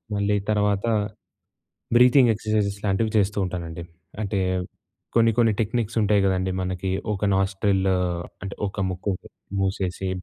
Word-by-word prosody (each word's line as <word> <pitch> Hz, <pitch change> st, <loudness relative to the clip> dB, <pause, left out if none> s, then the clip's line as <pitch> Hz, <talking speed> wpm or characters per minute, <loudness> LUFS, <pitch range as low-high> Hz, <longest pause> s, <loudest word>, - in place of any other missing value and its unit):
మళ్ళీ 100 Hz, 0 st, +1 dB
తర్వాత 105 Hz, -1 st, +1 dB, 1.1 s
breathing 125 Hz, 0 st, +6 dB
exercises 105 Hz, -2 st, -1 dB
లాంటివి 105 Hz, +3 st, +1 dB
చేస్తూ 100 Hz, 0 st, +1 dB
ఉంటానండి. 85 Hz, -2 st, -5 dB, 0.4 s
అంటే 100 Hz, -1 st, -1 dB, 0.8 s
కొన్ని 115 Hz, -1 st, +5 dB
కొన్ని 115 Hz, -3 st, +4 dB
టెక్నిక్స్ 115 Hz, 0 st, -1 dB
ఉంటాయి 105 Hz, -1 st, +3 dB
కదండీ 95 Hz, -1 st, +1 dB
మనకి 95 Hz, 0 st, -2 dB, 0.2 s
ఒక 105 Hz, 0 st, -2 dB
నాస్ట్రిల్ 95 Hz, 0 st, +1 dB, 0.6 s
అంటే 100 Hz, -, -5 dB
ఒక 100 Hz, -, -7 dB
ముక్కు 95 Hz, +2 st, -2 dB, 0.5 s
మూసేసి 95 Hz, -1 st, -1 dB
100 Hz, 115 wpm, -24 LUFS, 95-110 Hz, 1.1 s, breathing